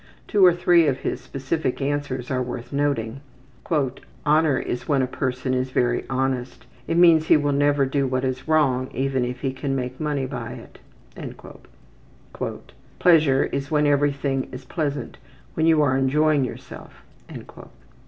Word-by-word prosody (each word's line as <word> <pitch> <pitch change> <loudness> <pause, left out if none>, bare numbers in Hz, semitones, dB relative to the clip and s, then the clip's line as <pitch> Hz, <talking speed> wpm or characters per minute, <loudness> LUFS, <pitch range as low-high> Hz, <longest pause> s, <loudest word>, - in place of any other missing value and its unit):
Two 205 -3 +3
or 180 - +8
three 175 -1 +4
of 135 -2 -1
his - - -3
specific 135 0 -3
answers 140 -2 -3
are 130 -1 0
worth 125 +1 -6
noting: 135 -4 -1 0.5
``Honor 150 0 0
is 120 - -4
when 140 -3 +2
a - - +2
person 130 0 -2
is 130 0 -1
very 120 -1 0
honest. 130 -1 -2 0.2
It 165 - 0
means 165 -2 +6
he - - +6
will 145 -1 0
never 145 0 +2
do 135 0 0
what 130 0 -1
is 130 +1 -3
wrong 135 -5 +2
even 135 -1 0
if 125 +1 -4
he 135 -3 -1
can 135 +1 -3
make 125 -1 -4
money 145 -3 -1
by - - -6
it.'' - - -13 2.2
``Pleasure 155 -6 +4
is 140 0 -3
when 150 -1 +2
everything 140 -2 +1
is 130 0 -9
pleasant, 145 -3 -4 0.3
when 160 0 +1
you 160 -2 +5
are 130 -2 +2
enjoying 145 +2 +2
yourself.'' - - -10
135 Hz, 155 wpm, -23 LUFS, 130-150 Hz, 2.2 s, or